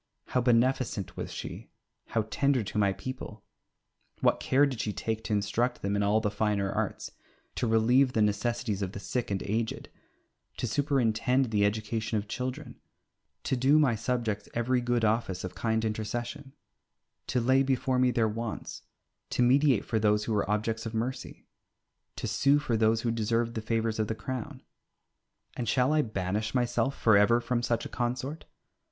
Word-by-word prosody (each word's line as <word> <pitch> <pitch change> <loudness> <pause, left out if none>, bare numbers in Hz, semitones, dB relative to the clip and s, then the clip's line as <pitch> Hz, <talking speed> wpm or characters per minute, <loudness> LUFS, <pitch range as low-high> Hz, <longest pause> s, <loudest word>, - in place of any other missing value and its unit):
How 125 - +1
beneficent 120 -4 +1
was - - -5
she, - - -7 0.4
how 110 -2 -1
tender 140 0 +2
to 105 - -5
my 100 -1 +3
people! 110 -1 -7 0.8
What - - +3
care 140 +2 +3
did 130 -6 -2
she 105 - -2
take 110 +1 -3
to - - -1
instruct 110 +4 0
them 100 +1 0
in 100 - +1
all 105 +2 +3
the 105 -2 -1
finer 100 -2 0
arts, - - -3 0.4
to 120 - -1
relieve 120 +4 +4
the 110 - +3
necessities 105 0 -1
of 95 -1 -3
the - - -6
sick 125 +4 -3
and 100 -1 -2
aged, 110 +3 -2 0.7
to - - -2
superintend 130 -1 +1
the 105 -2 +2
education 110 +1 -1
of 105 0 -3
children, 130 +3 -5 0.6
to - - 0
do 135 +4 +4
my 145 -6 +4
subjects 110 -2 -2
every 125 +2 +1
good 120 -2 +1
office 105 -4 0
of 95 - -5
kind 110 -1 0
intercession, 120 +6 -4 0.7
to 125 - +1
lay 130 +3 +4
before 130 -1 +1
me 130 0 +4
their 115 -2 +2
wants, 115 +1 -5 0.5
to 125 - +1
mediate 135 -1 +4
for 110 - 0
those 105 0 +2
who 110 - -2
were 105 -2 0
objects 110 +2 -1
of 115 - -6
mercy, 120 +4 -4 0.7
to - - -5
sue 140 +7 +3
for 145 -5 -1
those 110 0 +3
who 115 - 0
deserved 115 +1 0
the 110 - -3
favours 115 0 -1
of 110 - +1
the 110 - -2
Crown. 120 +2 -6 0.9
And 120 -4 -3
shall 130 +4 +3
I 155 - +4
banish 105 -1 -2
myself 125 +2 0
for 110 -2 +5
ever 115 +4 +5
from 120 0 -1
such 120 -1 -1
a - - -6
consort? 130 +5 -3
115 Hz, 175 wpm, -29 LUFS, 110-125 Hz, 0.9 s, for